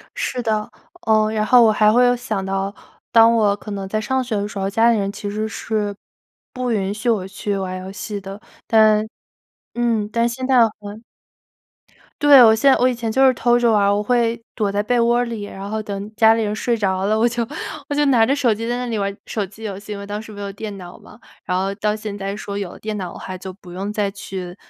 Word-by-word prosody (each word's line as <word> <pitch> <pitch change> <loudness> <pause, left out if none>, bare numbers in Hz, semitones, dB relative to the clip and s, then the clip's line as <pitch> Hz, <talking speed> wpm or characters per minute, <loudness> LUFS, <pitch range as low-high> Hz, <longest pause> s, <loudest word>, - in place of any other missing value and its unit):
是 250 - -2
的。 215 -2 -1 0.4
呃， 215 -1 +3
然 215 -1 0
后 245 +2 +6
我 220 - +5
还 215 0 +4
会 245 +3 +5
有 245 0 +4
想 220 -6 -3
到， 195 +1 -2 0.4
当 230 0 +6
我 210 -3 +3
可 210 +1 -10
能 195 -1 -4
在 215 +3 -1
上 260 +4 -1
学 240 -3 -3
的 205 0 -1
时 210 - -7
候， 195 0 -1
家 225 +3 +4
里 230 - +2
人 195 0 -1
其 205 0 -6
实 215 +2 -2
是 215 -2 -3 0.6
不 255 -1 -2
允 200 -3 -1
许 220 +4 -2
我 200 -5 0
去 200 +1 -3
玩 185 -1 -4
游 185 +1 -8
戏 205 +1 -6
的， 195 +1 -8 0.3
但 215 -1 +4 0.7
嗯， 230 -3 0
但 235 +1 +1
现 255 +2 -4
在 260 -1 +4 0.2
很 210 +2 -9 1.2
对， 285 -3 +8
我 220 -1 +7
现 275 +5 +4
我 250 - +3
以 255 - +1
前 230 -2 -3
就 265 +4 +4
是 260 - +5
偷 240 -1 +2
着 240 -1 +3
玩 210 -2 +3
儿， 200 0 +3
我 205 - 0
会 235 0 +1
躲 210 -3 -1
在 205 +1 0
被 245 +3 +1
窝 235 +1 +3
儿 245 - +1
里， 230 -3 -5
然 195 0 -8
后 215 +1 -3
等 205 0 -6
家 220 0 +5
里 225 - 0
人 210 0 -2
睡 235 +1 0
着 190 -2 0
了， 215 +1 +2
我 230 +2 +3
就 235 0 -2 0.5
我 290 - -1
就 295 0 +2
拿 250 -5 +4
着 270 +5 +2
手 260 -6 +2
机 230 +2 -5
在 240 - -1
那 250 - -3
里 235 -2 -3
玩 200 0 -2
手 215 - -2
机 200 +3 -11
游 200 -3 -5
戏， 210 +1 -10
因 - - -6
为 200 - -7
当 205 +1 -5
时 220 - -11
没 205 - -10
有 200 -1 -5
电 205 0 -7
脑 180 -1 -11
嘛。 210 - -16 0.3
然 180 - 0
后 195 +1 -1
到 210 +1 -1
现 215 -1 -6
在 195 0 -4
说 200 -1 -6
有 190 -3 -5
了 - - -13
电 215 0 -4
脑 180 -2 -5
的 - - -10
话 185 - -7
就 190 +1 -7
不 180 -1 -14
用 195 +3 -4
再 210 -1 -1
去 190 -3 -7
215 Hz, 275 characters per minute, -20 LUFS, 200-235 Hz, 1.2 s, 对